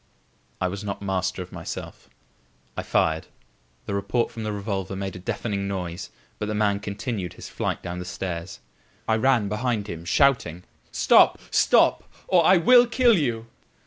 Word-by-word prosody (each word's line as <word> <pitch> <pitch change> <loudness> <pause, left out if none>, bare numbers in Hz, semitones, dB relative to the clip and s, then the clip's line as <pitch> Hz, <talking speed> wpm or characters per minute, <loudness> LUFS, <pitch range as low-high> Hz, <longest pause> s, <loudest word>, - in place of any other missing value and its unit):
I 90 - +1
was 100 +2 -5
not 100 -1 -5
master 95 -1 -1
of 90 - -16
myself. - - -8 0.7
I - - -2
fired. 80 0 0 0.6
The - - -4
report 100 +4 -1
from 115 - -7
the 110 -1 -2
revolver 100 -2 -3
made 95 0 -4
a - - -7
deafening 100 +2 -3
noise; 90 -2 -4 0.3
but 105 - -2
the 105 - -2
man 105 -1 +1
continued 100 -2 -4
his - - -10
flight - - -3
down 90 +1 -5
the 90 - -6
stairs. 90 -1 -5 0.5
I 110 - +3
ran 125 -3 +2
behind 105 +1 -1
him, 85 -4 -6
shouting: 90 - +2 0.3
"Stop! - - +5
stop! - - +3 0.2
or 180 -2 +4
I 185 +3 +6
will 245 +8 +6
kill 240 -1 +4
you!" 120 - -1
100 Hz, 165 wpm, -24 LUFS, 95-115 Hz, 0.7 s, I